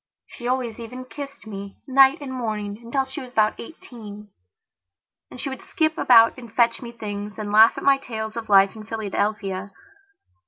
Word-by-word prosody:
She 240 - -8
always 245 -3 -1
even 250 +2 -8
kissed 280 0 -9
me, 200 -2 -8
night 270 +1 +5
and 270 -2 -6
morning, 215 -4 -4
until 265 +3 -1
she 270 +3 -7
was 250 -1 -10
about 215 -2 +2
eighteen. 210 -6 -11 1.0
And - - -11
she - - -4
would 265 -2 -6
skip 315 -1 0
about 230 -5 +5
and 235 -3 -11
fetch 235 +2 +2
me 235 -2 -7
things 205 -3 -6
and 210 -1 -4
laugh 220 +2 +6
at - - -5
my 275 -1 +4
tales 220 -4 -6
of 230 -2 -6
life 195 +1 +5
in 215 - -9
Philadelphia. 205 -3 -2
230 Hz, 180 wpm, -23 LUFS, 210-255 Hz, 1.0 s, laugh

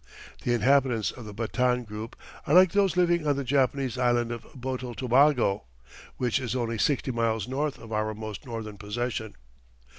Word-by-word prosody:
The 120 - +1
inhabitants 125 -3 +2
of 120 - -11
the 105 - -8
Batan 125 +2 0
group 110 +1 -7 0.3
are 150 - +3
like 185 -1 +7
those 195 -3 +2
living 175 -3 +2
on 145 - +3
the 140 - -2
Japanese 135 -1 +1
island 120 -1 +2
of 120 -1 -4 0.2
Botel 130 -1 -4
Tobago, 125 - +3 0.5
which 125 -1 +1
is 125 -1 -3
only 115 -3 -2
sixty 135 +2 +1
miles 115 -3 0
north 140 +2 -2
of 115 - -12
our 110 0 -1
most 110 -1 -7
northern 110 -4 -6
possession. 110 +1 -3
125 Hz, 170 wpm, -27 LUFS, 110-135 Hz, 0.5 s, like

